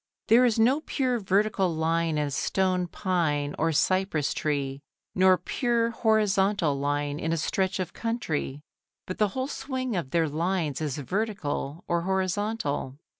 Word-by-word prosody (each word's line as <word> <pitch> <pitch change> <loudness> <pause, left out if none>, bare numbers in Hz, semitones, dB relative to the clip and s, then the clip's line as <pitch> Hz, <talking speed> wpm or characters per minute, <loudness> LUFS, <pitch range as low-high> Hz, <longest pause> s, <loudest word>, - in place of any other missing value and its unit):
There 240 +3 +7
is 235 -2 +2
no 255 +7 +4
pure 255 -6 0
vertical 195 -1 +1
line 165 0 0
in 150 - +1
a - - -8
stone 185 +4 0
pine 160 -6 -1
or 165 +1 +2
cypress 185 -1 +1
tree, 140 -3 -2 0.3
nor 185 0 +5
pure 235 0 0
horizontal 200 - +2
line 145 +1 -1
in 165 - -2
a 165 - +1
stretch 190 +4 -1
of 180 -2 -3
country, 160 - -3 0.4
but 185 - -6
the 210 - +4
whole 260 +1 0
swing 260 -4 -3
of 170 -7 -2
their 165 +2 +2
lines 160 -1 -1
is 150 -3 -2
vertical 165 - -3
or 170 0 +1
horizontal. 190 -6 -1
185 Hz, 150 wpm, -27 LUFS, 150-215 Hz, 0.4 s, There